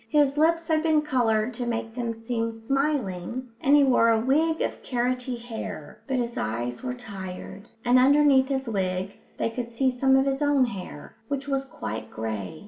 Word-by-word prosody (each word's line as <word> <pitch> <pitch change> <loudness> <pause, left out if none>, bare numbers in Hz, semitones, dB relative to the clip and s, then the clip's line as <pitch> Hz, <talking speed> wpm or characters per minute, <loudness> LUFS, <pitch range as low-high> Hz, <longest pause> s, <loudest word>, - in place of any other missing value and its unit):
His 290 -2 +3
lips 330 +2 +2
had 315 -1 +2
been 310 -2 +3
coloured 240 -4 +1
to 240 +1 -4
make 230 -1 -3
them 235 -1 -2
seem 230 0 -2
smiling, 250 -2 -2
and 280 +2 +5
he 290 - +6
wore 245 -3 +4
a 225 -1 +4
wig 310 +7 +2
of - - -3
carroty 250 0 -1
hair, 235 -1 -7
but 265 -2 0
his 240 -1 -2
eyes 120 +3 -3
were 250 -1 -3
tired, 195 -3 -8 0.2
and 245 +1 +5
underneath 275 0 +5
his 270 -1 -2
wig 190 -2 -2 0.2
they 230 - -1
could 235 0 -4
see 260 +3 +1
some 265 +1 +3
of 265 0 +4
his 275 +1 -1
own 290 -3 +4
hair, 190 -10 -8
which 280 +1 -3
was 270 -1 -1
quite 110 - -6
grey. 110 +5 -5
245 Hz, 185 wpm, -26 LUFS, 225-275 Hz, 0.2 s, he